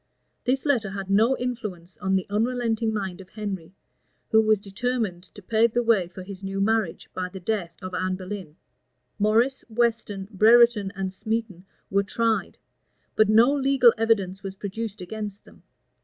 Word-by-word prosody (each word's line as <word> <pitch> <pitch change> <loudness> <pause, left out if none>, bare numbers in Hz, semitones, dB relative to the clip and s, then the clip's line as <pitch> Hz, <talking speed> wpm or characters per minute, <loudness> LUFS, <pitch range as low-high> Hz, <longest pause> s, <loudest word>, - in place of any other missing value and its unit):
[*] - - -48
This 260 +3 +1
letter 245 -9 +1
had 195 -1 -5
no 225 +6 +4
influence 210 -8 -5
on 195 -3 0
the 190 - 0
unrelenting 225 +1 0
mind 195 -3 -4
of 185 - -15
Henry, 195 -5 -6 0.6
who 220 - +6
was 215 -1 +3
determined 205 -2 -2
to 205 - -12
pave 225 +3 +2
the 240 - +2
way 220 -6 +3
for 185 +1 -10
his 190 0 -9
new 195 0 -4
marriage 215 -3 0
by 185 -1 -3
the 190 - -8
death 180 -3 -2
of 185 0 -6
Anne 185 +1 -1
Boleyn. 185 -4 -7 0.6
Morris, 230 +6 +2
Weston, 220 -4 -1
Brereton, 225 0 +5
and 190 0 -3
Smeton, 215 -2 -3 0.3
were 200 +1 +3
tried; 225 +3 -1 0.6
but 215 -1 +4
no 230 +5 +6
legal 270 -4 +5
evidence 200 -4 +1
was 195 -1 -6
produced 210 +1 -5
against 205 +2 -6
them. - - -18
210 Hz, 165 wpm, -25 LUFS, 190-230 Hz, 0.6 s, who